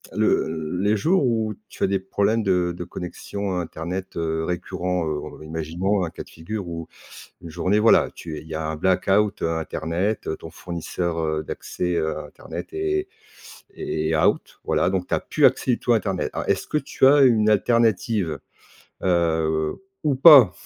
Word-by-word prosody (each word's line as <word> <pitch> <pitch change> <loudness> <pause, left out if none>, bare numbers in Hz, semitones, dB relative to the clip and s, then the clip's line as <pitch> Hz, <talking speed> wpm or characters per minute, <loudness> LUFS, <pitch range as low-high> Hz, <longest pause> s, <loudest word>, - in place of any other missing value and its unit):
le 80 +1 0
les 105 +3 +2
jours 165 - +2
où, 110 -3 0 0.2
tu - - -6
as - - +4
des 95 0 0
problèmes 100 +4 0
de 90 -3 +1
de 90 - -5
connexion, 95 +2 -5
heu, - - 0
internet, 85 +3 -5
heu, 80 -1 -1
récurrent, 90 0 -2
heu, 75 -1 -2 0.2
r - - -11
imaginons, 85 +5 -1
un 85 - -2
cas - - -8
de - - -19
figure, 90 +4 -6
où 85 -1 -6 0.6
une 85 - -8
journée, 90 +5 +1
voilà, 115 +2 +5
tu 80 -2 -7
es - - -7
il 80 - -15
y 80 - -6
a 80 0 -2
un 80 0 -3
black-out, 95 +4 +1
heu, 80 - +1
internet. 85 +6 -2
Ton 80 - -10
fournisseur, 85 0 -4
heu, 80 -1 -1
d'accès, 90 +3 -4
heu, 80 -2 -1
internet 75 - -9
est 390 -1 -1 0.7
est 80 +1 -1
out. 90 +7 +1
Voilà, 90 - +1
donc 95 -1 -2
tu - - -3
as - - +2
plus - - +1
accès - - +3
du 120 - 0
tout 120 - +2
à - - +5
internet. 95 -4 -2
Alors, - - -4
est-ce - - 0
que - - 0
tu 135 -2 +1
as 145 +1 +6
une 110 -4 +4
alternative? 110 -4 +2 0.6
Heu, 80 - +1 0.2
ou 145 -2 +2
pas? 135 - +9
90 Hz, 185 wpm, -23 LUFS, 80-105 Hz, 0.7 s, pas